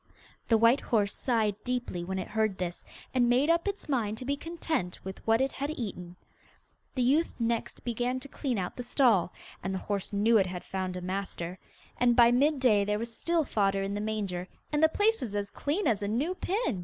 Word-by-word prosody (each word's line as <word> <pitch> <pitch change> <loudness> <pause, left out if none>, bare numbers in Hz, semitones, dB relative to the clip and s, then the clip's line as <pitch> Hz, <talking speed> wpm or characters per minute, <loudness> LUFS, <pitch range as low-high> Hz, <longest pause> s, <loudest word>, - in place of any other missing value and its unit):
The 225 - +5
white 230 +5 +5
horse 205 -4 +1
sighed 215 -5 0
deeply 245 -8 -2
when 190 +2 -3
it 185 - -3
heard 215 -3 0
this, 175 -1 -4 0.3
and 245 -2 +3
made 265 +6 +4
up 335 +3 +1
its 405 0 -3
mind 225 -7 0
to 255 - -6
be 280 +2 0
content 315 - -3
with 190 0 -6
what 225 +2 +4
it 270 0 +1
had 280 +2 -3
eaten. 190 - -5 0.8
The 255 - +1
youth 290 +7 +3
next 230 -1 -2
began 245 +2 -1
to 280 - -8
clean 265 -4 -2
out 180 -2 -3
the - - -5
stall, 240 - +3 0.3
and 190 - -3
the 190 - -5
horse 200 -2 -2
knew 215 +2 +4
it 190 - +2
had 180 -1 -5
found 185 -1 -3
a - - -5
master; 185 -1 -4 0.4
and 240 -1 +4
by 235 0 +7
mid 280 +4 +3
day 215 -6 +4
there 210 +1 0
was 230 +1 -5
still 335 +3 +1
fodder 195 -6 +1
in 195 +1 -2
the 205 - -2
manger, 200 -4 -2 0.2
and 295 0 +1
the 315 - +6
place 430 +6 +2
was 220 -5 -4
as 200 0 -2
clean 320 +8 -1
as 210 -2 +2
a 200 - -1
new 265 - 0
pin. 370 - -1
230 Hz, 215 wpm, -29 LUFS, 195-265 Hz, 0.8 s, by